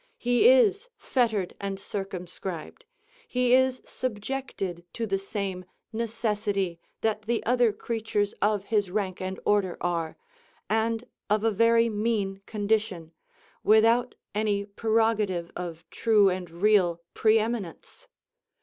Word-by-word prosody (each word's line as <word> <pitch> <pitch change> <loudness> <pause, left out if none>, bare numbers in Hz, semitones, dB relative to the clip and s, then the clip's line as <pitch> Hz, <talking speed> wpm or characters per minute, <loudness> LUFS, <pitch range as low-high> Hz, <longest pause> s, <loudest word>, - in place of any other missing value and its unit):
He 245 - +4
is 485 -2 +4
fettered 220 -8 0
and 195 -1 -3
circumscribed, 185 -3 -6 0.4
he 250 -1 +2
is 260 0 +3
subjected 210 -6 -4
to 230 - -2
the 195 -2 -1
same 195 -2 -4 0.3
necessity 210 -5 -1 0.2
that 220 -1 0
the 235 0 0
other 245 -1 +3
creatures 210 -1 -2
of 210 -1 +2
his 205 -2 0
rank 190 -2 -2
and 185 0 -4
order 200 -4 +2
are, 170 -2 -2 0.5
and 225 +1 0 0.3
of 210 +1 +2
a 225 - +3
very 230 +2 +4
mean 210 -3 -1
condition, 205 -6 -1 0.5
without 230 +3 +4 0.2
any 205 -1 0
prerogative 215 -4 0
of 170 -2 -6
true 215 -3 +4
and 180 -1 -3
real 175 -1 +2
pre 220 0 +4
eminence. 220 -6 -4
210 Hz, 120 wpm, -27 LUFS, 190-230 Hz, 0.5 s, He